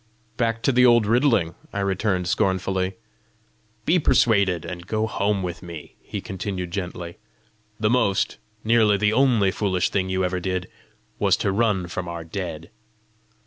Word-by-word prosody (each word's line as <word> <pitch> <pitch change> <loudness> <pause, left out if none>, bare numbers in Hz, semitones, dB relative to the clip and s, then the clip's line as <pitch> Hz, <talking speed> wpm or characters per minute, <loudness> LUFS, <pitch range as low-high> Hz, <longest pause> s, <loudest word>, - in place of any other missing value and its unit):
"Back 115 -1 -1
to - - +3
the 125 0 +4
old 120 -3 +6
riddling!" 115 - +2 0.2
I 100 - -3
returned 95 -1 0
scornfully. 95 -1 0 0.9
"Be 175 +3 +4
persuaded, 100 - +3
and 85 0 -7
go 110 +1 0
home 100 -2 0
with 85 -2 -5
me," 85 -4 -9
he - - -6
continued 95 -2 -5
gently. 90 -2 -5 0.6
"The 105 0 +2
most 100 -6 +1 0.2
nearly 110 -2 +4
the 105 +1 +2
only 115 -6 +3
foolish 95 -2 0
thing 95 -1 0
you 95 0 0
ever 90 0 -1
did, 90 0 -2 0.5
was - - +3
to 100 - 0
run 100 -3 +1
from 90 +1 -5
our 85 -1 -5
dead." 85 -2 -6
95 Hz, 150 wpm, -23 LUFS, 90-110 Hz, 0.9 s, old